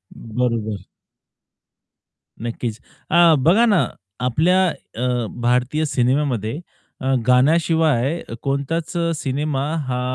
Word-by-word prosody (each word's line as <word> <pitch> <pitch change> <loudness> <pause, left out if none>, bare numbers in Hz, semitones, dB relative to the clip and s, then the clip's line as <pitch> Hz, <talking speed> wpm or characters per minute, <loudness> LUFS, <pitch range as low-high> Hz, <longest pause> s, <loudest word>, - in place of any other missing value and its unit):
हं. 115 -1 -11
बरोबर. 110 -5 -1 1.6
नक्कीच. 115 -1 -4 0.3
अ, 170 -2 +6
बघा 185 - +4
ना 205 -6 +3 0.4
आपल्या 180 +9 +3 0.3
अ, 120 - -3 0.4
भारतीय 125 +6 +1
सिनेमामध्ये 125 -2 0 0.4
अ, 135 0 +1
गाण्याशिवाय 155 +1 +3 0.2
कोणताच 140 +4 -2 0.3
सिनेमा 140 0 -2 0.2
हा 125 0 -1
135 Hz, 90 wpm, -21 LUFS, 120-160 Hz, 1.6 s, अ